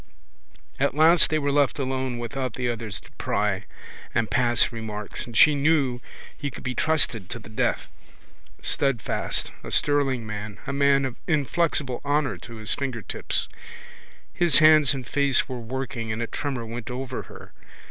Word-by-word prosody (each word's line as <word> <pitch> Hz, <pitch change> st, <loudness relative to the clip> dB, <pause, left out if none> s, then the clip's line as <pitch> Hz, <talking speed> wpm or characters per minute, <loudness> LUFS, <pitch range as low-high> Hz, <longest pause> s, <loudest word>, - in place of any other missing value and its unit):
At 140 Hz, 0 st, +1 dB
last 160 Hz, +2 st, +6 dB
they 155 Hz, -, +1 dB
were 145 Hz, -2 st, 0 dB
left 145 Hz, -1 st, +2 dB
alone 130 Hz, -2 st, -2 dB
without 120 Hz, +1 st, -4 dB
the 125 Hz, -1 st, -2 dB
others 115 Hz, -3 st, -3 dB
to -, -, -18 dB
pry -, -, 0 dB, 0.5 s
and 115 Hz, -2 st, +1 dB
pass 120 Hz, -2 st, +3 dB
remarks 110 Hz, -2 st, -6 dB
and 115 Hz, -2 st, -5 dB
she 155 Hz, -, +7 dB
knew 140 Hz, -4 st, +1 dB, 0.3 s
he 145 Hz, -, -4 dB
could -, -, -10 dB
be 125 Hz, -, -2 dB
trusted 125 Hz, -, 0 dB
to 120 Hz, -, -4 dB
the 110 Hz, -3 st, -12 dB
death, 110 Hz, -, 0 dB, 0.8 s
steadfast, 135 Hz, -5 st, 0 dB
a -, -, -7 dB
sterling 135 Hz, -5 st, +1 dB
man, 105 Hz, -1 st, -6 dB
a 140 Hz, -, -3 dB
man 140 Hz, 0 st, +3 dB
of 130 Hz, -2 st, -5 dB
inflexible 150 Hz, -4 st, 0 dB
honour 145 Hz, 0 st, 0 dB
to 115 Hz, -, -10 dB
his 110 Hz, -1 st, +2 dB
fingertips. 130 Hz, -7 st, -2 dB, 0.9 s
His 170 Hz, -5 st, +5 dB
hands 155 Hz, -3 st, +6 dB
and 130 Hz, -2 st, -6 dB
face 140 Hz, -1 st, +3 dB
were 130 Hz, -3 st, -5 dB
working 120 Hz, -1 st, -4 dB
and 110 Hz, -, -3 dB
a 120 Hz, -, -1 dB
tremour 130 Hz, -1 st, -4 dB
went 115 Hz, 0 st, -6 dB
over 125 Hz, 0 st, -4 dB
her. -, -, -13 dB
130 Hz, 160 wpm, -25 LUFS, 115-145 Hz, 0.9 s, she